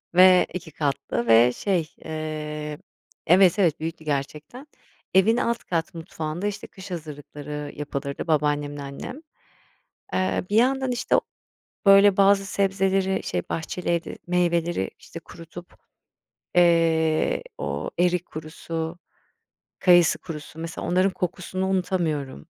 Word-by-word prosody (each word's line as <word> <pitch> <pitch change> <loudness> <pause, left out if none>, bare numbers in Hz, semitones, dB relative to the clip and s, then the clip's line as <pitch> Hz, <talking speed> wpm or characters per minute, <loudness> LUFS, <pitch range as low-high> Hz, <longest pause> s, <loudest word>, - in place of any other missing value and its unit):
ve 185 0 +7
2 165 -3 -6
katlı 140 -5 -2
ve 115 +2 +6
şey, 175 -3 -1 0.2
eee 150 -1 -5 0.5
evet, 185 +2 +5
evet, 170 -6 +2
büyüktü 160 0 -5
gerçekten. 150 - -4 0.5
Evin 205 +5 +4
alt 235 -1 -1
kat 170 +2 -2
mutfağında, 165 +2 -4
işte, 205 0 -5
kış 190 0 -12
hazırlıkları 150 -2 -7
yapılırdı 140 +1 -5
babaannemle 145 -2 0
annem. 140 - -7 0.9
Eee, 185 0 0
bir 210 - +1
yandan, 265 +2 +3
işte, 245 - +1
o - - +3 0.7
böyle 195 0 +7
bazı 195 0 +4
sebzeleri, 195 -1 +1
şey, 90 - -2
bahçeli 165 +2 -4
evde 170 -1 -2
meyveleri, 175 - 0
işte, - - -10
kurutup, 170 +1 -12 0.8
eee, 165 -2 +3 0.2
o 70 +2 -3
erik 180 0 +2
kurusu, 160 +1 -6 0.8
kayısı 175 -3 +5
kurusu, 155 -2 -9
mesela, 165 0 -5
onların 185 +2 +3
kokusunu 185 +1 -3
unutamıyorum. 165 - -1
170 Hz, 115 wpm, -24 LUFS, 150-190 Hz, 0.9 s, ve